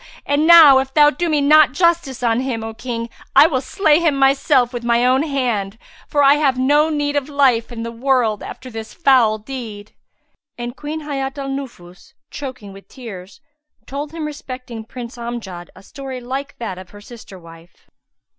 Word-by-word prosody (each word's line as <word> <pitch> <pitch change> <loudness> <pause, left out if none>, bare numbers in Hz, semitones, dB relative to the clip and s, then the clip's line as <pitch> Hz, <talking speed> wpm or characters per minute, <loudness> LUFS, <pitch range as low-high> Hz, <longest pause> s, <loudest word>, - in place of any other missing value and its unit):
And 290 +2 +1
now 320 -6 +9
if 265 0 -3
thou 295 -1 +6
do 345 +2 -2
me 300 -2 +1
not 300 -1 +5
justice 335 -6 0
on 230 0 +2
him, 250 -4 -3
O 225 0 -6
King, 230 0 -5 0.3
I - - +8
will 275 -6 0
slay 310 +1 +2
myself 270 -2 +2
with 240 -1 -5
my 235 +1 +2
own 255 +2 +3
hand, 240 -9 -2 0.3
for 290 -1 +1
I 280 +1 +6
have 275 -4 +1
no 290 +4 +3
need 290 -1 -2
of 285 0 -1
life 260 -5 +2
in 230 -1 -6
the 230 - -5
world 235 -3 0
after 255 0 -9
this 220 -1 -8
foul 255 -9 +3
deed." 215 -3 -9 0.6
And 240 +1 -6
Queen 300 +3 -6
Hayat 275 -2 -4
al 275 -1 -5
Nufus, 235 -10 -9 0.2
choking 255 -8 -8
with 195 0 -15
tears, 205 -4 -11 0.4
told 285 +3 -6
him 325 -1 -5
respecting 255 -6 -8
Prince 240 +1 -9
Amjad 215 -7 -7
a - - -15
story 265 +2 -8
like 270 +3 -6
that 190 -6 -6
of 185 -1 -12
her 205 +2 -14
sister 220 -3 -12
wife. 165 0 -17
260 Hz, 180 wpm, -19 LUFS, 230-285 Hz, 0.6 s, now